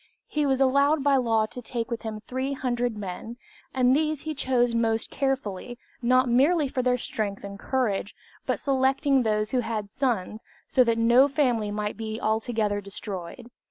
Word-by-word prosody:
He 300 -1 -1
was 265 -1 +1
allowed 280 +2 +3
by 280 -1 +4
law 225 -3 +2
to 250 +3 -8
take 235 0 -4
with 235 - -3
him 220 -2 -5
300 250 -2 -2
men, 210 +4 -6 0.3
and 255 0 +3
these 310 -1 0
he 315 - -4
chose 250 -4 +1
most 225 -1 0
carefully, 250 -4 -2 0.2
not 255 +2 +3
merely 285 +6 +3
for 260 -1 -2
their 250 0 +2
strength 210 -4 -4
and 200 0 -8
courage, 215 -7 -1 0.3
but - - 0
selecting 270 0 +2
those 215 -2 0
who 255 - +2
had 215 -4 -3
sons, 220 -5 -2 0.2
so 255 - +4
that 230 -1 +1
no 240 +4 +5
family 250 -7 +1
might 210 0 -3
be 220 0 -4
altogether 220 -2 0
destroyed. 200 +3 -7
240 Hz, 165 wpm, -26 LUFS, 215-265 Hz, 0.3 s, no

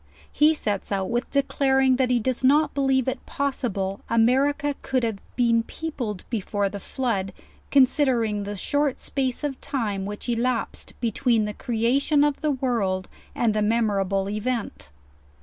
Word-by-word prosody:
He 305 +1 +4
sets 205 -9 -2
out 195 0 -1
with 240 +2 -1
declaring, 270 -2 +2
that 260 -1 +2
he 245 -1 +3
does 255 +2 -2
not 290 +3 +4
believe 270 -2 +1
it 260 0 -2
possible 205 -9 -2
America 275 +5 +2
could 255 -2 0
hare 225 -3 -1 0.2
been 235 -2 +3
peopled 235 -7 -5
before 205 -2 -1
the 200 - -6
flood, 200 -4 -2 0.4
considering 255 -6 +3
the 205 +1 -4
short 285 +7 0
space 265 0 -2
of 280 -3 -3
time 205 -7 -2
which 205 +3 -6
elapsed 240 0 -2
between 230 -1 +1
the 210 - -4
creation 250 +7 +1
of 295 -1 0
the 305 - +1
world 230 -9 -1 0.3
and 230 -3 +2
the 215 - 0
memorable 200 -3 +1
event. 215 - -3
240 Hz, 150 wpm, -24 LUFS, 210-270 Hz, 0.4 s, He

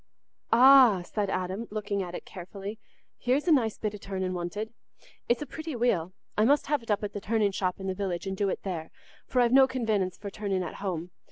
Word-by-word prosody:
"Ah," 250 -6 +7
said 205 +2 -2
Adam, 190 +4 -2
looking 205 -1 -2
at 180 -1 -5
it - - -7
carefully, 195 +4 -8 0.4
"here's 260 +6 +1
a - - +5
nice 235 -8 +3
bit 215 -1 -2
o' 210 - -8
turning 190 -2 -3
wanted. 185 +6 -4 0.6
It's 240 +4 +2
a - - -7
pretty 315 -1 -6
wheel. 195 -8 +1 0.2
I 210 - +3
must 285 +6 +4
have 295 -1 0
it 230 - -16
up 210 0 +1
at 205 - -3
the 205 - -5
turning 210 -1 +1
shop 185 -1 -2
in 190 - -6
the 190 - -1
village 185 -2 -3
and 190 0 -3
do 200 0 0
it - - -3
there, 170 -5 -4 0.4
for 250 - +2
I've 240 0 +3
no 265 0 +7
convenence 215 -8 -1
for 200 -1 -7
turning 195 -3 -2
at - - -5
home. 180 -3 -3
205 Hz, 225 wpm, -28 LUFS, 185-235 Hz, 0.6 s, Ah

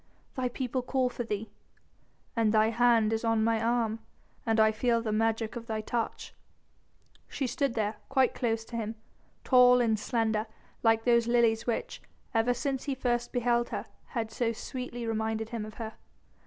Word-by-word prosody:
"The 255 -2 -1
people 255 0 -2
call 255 0 0
for 245 - -4
thee." 215 -1 -4 0.8
"And 225 -2 +3
thy 220 0 +4
hand 230 -2 +4
is 225 - -1
on 225 -1 +2
my 225 0 +2
arm 230 -1 +1 0.5
and 225 0 +2
I 220 0 +6
feel 230 +2 +1
the 225 -2 -2
magic 225 +1 0
of 230 -1 -7
thy 220 -2 -2
touch." 230 +1 -3 0.9
She 275 - -3
stood 260 0 -1
there 215 -1 -1
quite 265 -2 +3
close 225 -3 -1
to 235 - -9
him, 225 -1 -3 0.5
tall 250 -1 +6
and 225 -3 +2
slender 220 -1 0 0.3
like 225 -1 +3
those 235 -1 +3
lilies 235 -1 +3
which 235 - -2 0.3
ever 235 +2 +2
since 270 -1 -2
he 280 -2 -1
first 240 -2 -1
beheld 240 -1 +1
her - - -4 0.3
had 225 -1 -2
so 230 +1 0
sweetly 245 0 -6
reminded 220 0 -2
him 230 -3 -4
of 215 - -10
her. 220 -1 -6
230 Hz, 170 wpm, -29 LUFS, 220-245 Hz, 0.9 s, I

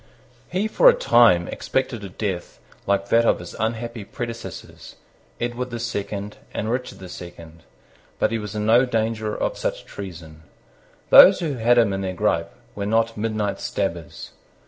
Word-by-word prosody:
He 190 +5 0
for - - +6
a - - +4
time 115 - +4
expected 130 -4 -2
a 100 - -6
death 95 -2 -4 0.3
like 100 0 0
that 115 0 +4
of - - +3
his 85 0 -9
unhappy 115 0 -3
predecessors, 115 +1 -8 0.4
Edward 120 +1 -3
the 120 -1 -5
Second 105 -3 -4 0.2
and 110 - -2
Richard 125 +1 -3
the 95 - -10
Second. 85 -2 -11 0.6
But 110 - +1
he 115 - -1
was 105 -1 -7
in 105 0 -2
no 115 +3 +5
danger 110 -2 -1
of - - -2
such - - -3
treason. 85 -5 -9 0.7
Those - - +9
who 160 -4 -2
had 120 0 +3
him 115 -4 +4
in 95 - -2
their 95 -1 -3
gripe 85 -1 0 0.2
were 100 0 -4
not 115 +1 +1
midnight 110 -2 -2
stabbers. 85 -6 -4
110 Hz, 165 wpm, -23 LUFS, 95-120 Hz, 0.7 s, Those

